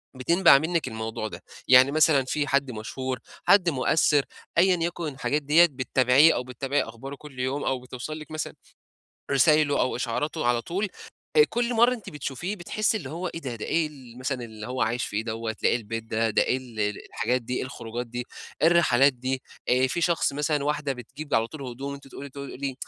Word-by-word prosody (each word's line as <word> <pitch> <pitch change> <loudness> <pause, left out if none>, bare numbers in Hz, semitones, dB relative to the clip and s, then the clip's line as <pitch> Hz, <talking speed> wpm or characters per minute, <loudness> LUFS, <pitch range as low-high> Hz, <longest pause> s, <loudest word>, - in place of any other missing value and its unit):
بتنبَع 165 +4 +5
منِّك 160 0 -1
الموضوع 110 -1 -4
ده. - - -10 0.2
يعني 130 +2 +7
مثلًا 155 -3 +4
في 145 +2 -1
حد 140 -1 +1
مشهور، 125 +3 -4 0.3
حد 185 -4 +5
مؤثّر 145 0 +2 0.3
أيًا 185 +2 +5
يكن 170 -1 -2
الحاجات 145 +3 -1
ديّة، 150 +5 +6
بتتابعيه 130 +3 +4
أو - - -2
بتتابعي 130 +3 -1
أخباره 120 +5 -8
كل 140 -2 -13
يوم 130 +3 -1
أو 130 -1 0
بتوصل 130 +5 -7
لِك 155 0 -11
مثلًا 155 -1 -4 0.8
رسايله 145 +1 +4
أو 130 - 0
إشعاراته 135 +5 -2
على 120 -1 +2
طول، 195 - -2 0.5
آآ 450 - +9
كل 240 +1 0
مرّة 240 +2 +5
أنتِ 220 - -10
بتشوفيه 150 +7 -4
بتحسّي 215 +4 0
اللي 140 -9 -8
هو 175 +4 -4
إيه 165 - -6
ده، 130 -5 -5
ده 110 - -6
إيه 165 -2 +1
ال 130 -5 -14
مثلًا 130 -1 -3
اللي 110 -1 -9
هو 125 +1 -3
عايش 120 +2 0
فيه 105 +2 -3
دوّة، 115 0 -3
ده - - +5
إيه - - +2
البيت 115 -1 -4
ده، 115 0 0
ده 110 - +3
إيه 130 - +1
ال 120 -4 -10 0.3
الحاجات 125 +2 -1
دي، 125 +2 -4
إيه - - -2
الخروجات 120 -2 -6
دي، 120 +1 -5 0.4
إيه 160 - +6
الرحلات 145 -6 +5
دي؟ 130 +1 -3 0.3
آآ 130 +1 +4
في 170 - -2
شخص 165 -4 +2
مثلًا 145 0 0
واحدة 150 -1 -1
بتجيب 135 +4 -8
على 115 0 +2
طول 155 +1 -10
هدوم 135 +3 -5
أنتِ 140 -1 -11
تقولي 140 +1 -9
تقولي 140 0 -6
135 Hz, 200 wpm, -26 LUFS, 125-155 Hz, 0.8 s, آآ